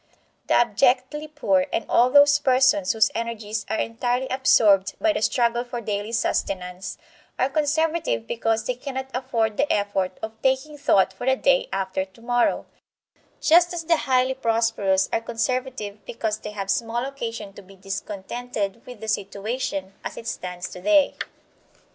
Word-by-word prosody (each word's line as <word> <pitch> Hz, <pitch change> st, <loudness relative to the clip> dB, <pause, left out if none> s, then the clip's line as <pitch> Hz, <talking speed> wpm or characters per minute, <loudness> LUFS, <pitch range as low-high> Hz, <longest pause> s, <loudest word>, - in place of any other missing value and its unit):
The -, -, +3 dB
abjectly 255 Hz, +6 st, +2 dB
poor, 290 Hz, -2 st, +1 dB
and 225 Hz, -, -1 dB
all 245 Hz, +1 st, +4 dB
those 285 Hz, +1 st, +6 dB
persons 255 Hz, -8 st, +3 dB
whose 220 Hz, 0 st, +3 dB
energies 220 Hz, -2 st, -4 dB
are 220 Hz, -, 0 dB
entirely 245 Hz, +3 st, -1 dB
absorbed 210 Hz, -7 st, +4 dB
by 325 Hz, -1 st, +2 dB
the -, -, -2 dB
struggle 235 Hz, +1 st, +1 dB
for 245 Hz, -1 st, -6 dB
daily 210 Hz, -1 st, -3 dB
sustenance, 185 Hz, -5 st, -2 dB, 0.4 s
are 260 Hz, -, +1 dB
conservative 310 Hz, -, 0 dB
because 225 Hz, -, -1 dB
they 250 Hz, -, 0 dB
cannot 265 Hz, +1 st, -6 dB
afford 230 Hz, -4 st, -1 dB
the 290 Hz, -, +1 dB
effort 200 Hz, -2 st, 0 dB
of 220 Hz, 0 st, -7 dB
taking 265 Hz, +3 st, 0 dB
thought 200 Hz, -10 st, +3 dB
for 245 Hz, +6 st, -7 dB
the 265 Hz, -, +4 dB
day 270 Hz, 0 st, +2 dB
after 190 Hz, -1 st, -1 dB
tomorrow; 235 Hz, +5 st, -1 dB, 0.7 s
just 345 Hz, +2 st, +5 dB
as 335 Hz, -, -3 dB
the 330 Hz, 0 st, +3 dB
highly 260 Hz, -2 st, +2 dB
prosperous 225 Hz, -6 st, +1 dB
are -, -, +1 dB
conservative 230 Hz, -3 st, -3 dB
because 220 Hz, -2 st, -2 dB
they 210 Hz, -, -7 dB
have 195 Hz, -2 st, -3 dB
small 235 Hz, +1 st, -1 dB
occasion 230 Hz, -7 st, -6 dB
to 200 Hz, -, -11 dB
be 195 Hz, 0 st, -17 dB
discontented 200 Hz, +3 st, -5 dB
with 245 Hz, -4 st, -10 dB
the 220 Hz, -, -6 dB
situation 200 Hz, -1 st, -3 dB
as -, -, -6 dB
it -, -, -8 dB
stands 180 Hz, -6 st, -5 dB
today. 290 Hz, +11 st, +2 dB
230 Hz, 155 wpm, -24 LUFS, 205-265 Hz, 0.7 s, those